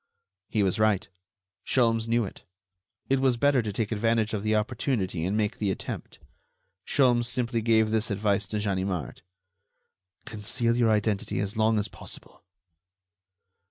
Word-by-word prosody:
He 105 -3 +1
was 95 +1 0
right; 110 -2 +2 0.6
Sholmes 115 -3 +2
knew 115 0 +2
it. - - -10 0.6
It 135 0 +2
was 130 -2 +2
better 140 0 +3
to 110 -2 -3
take 105 +1 -2
advantage 110 0 +1
of 105 - -1
the 110 +1 +1
opportunity 105 - -1
and 100 +3 0
make 105 -1 -1
the 105 - 0
attempt. 95 - -5 0.7
Sholmes 120 -4 +3
simply 120 -1 0
gave 110 -1 +3
this 110 0 +1
advice 100 0 0
to 105 - -3
Ganimard: 95 - -2 1.0
"Conceal 115 +2 -1
your 120 -2 +3
identity 105 -1 0
as 100 0 -2
long 110 0 +3
as 105 0 0
possible." - - -9
110 Hz, 145 wpm, -27 LUFS, 105-115 Hz, 1.0 s, better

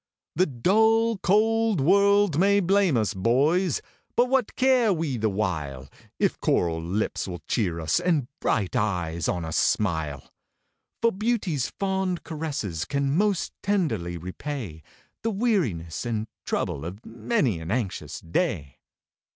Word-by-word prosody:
The 185 +4 +3
dull, 220 - +3
cold 220 0 +2
world 200 +1 +4
may 200 +2 +4
blame 190 -5 +3
us, 105 -3 0
boys! 140 - +2 0.3
but 245 +1 +3
what 260 -4 +1
care 255 -4 +4
we 160 -7 -1
the 110 -2 0
while, 80 -10 -3 0.3
If - - 0
coral 80 -2 +1
lips 95 +7 -2
will 90 -4 -7
cheer 90 -7 0
us, 80 - +1
and 165 -8 +1
bright 105 0 0
eyes 90 -8 -1
on 90 -2 -1
us 80 - -2
smile? 80 -9 0 0.7
For 230 - +5
beauty's 200 - -1
fond 190 -2 -1
caresses 145 - -3
can 140 0 0
most 200 0 +1
tenderly 115 - -1
repay 95 - -6 0.4
The 225 - 0
weariness 175 - -1
and 110 -2 -2 0.2
trouble 70 - -2
of 95 +7 -8
many 115 - 0
an 80 0 -7
anxious 110 -3 -3
day. 85 - -2
135 Hz, 135 wpm, -25 LUFS, -, 0.7 s, For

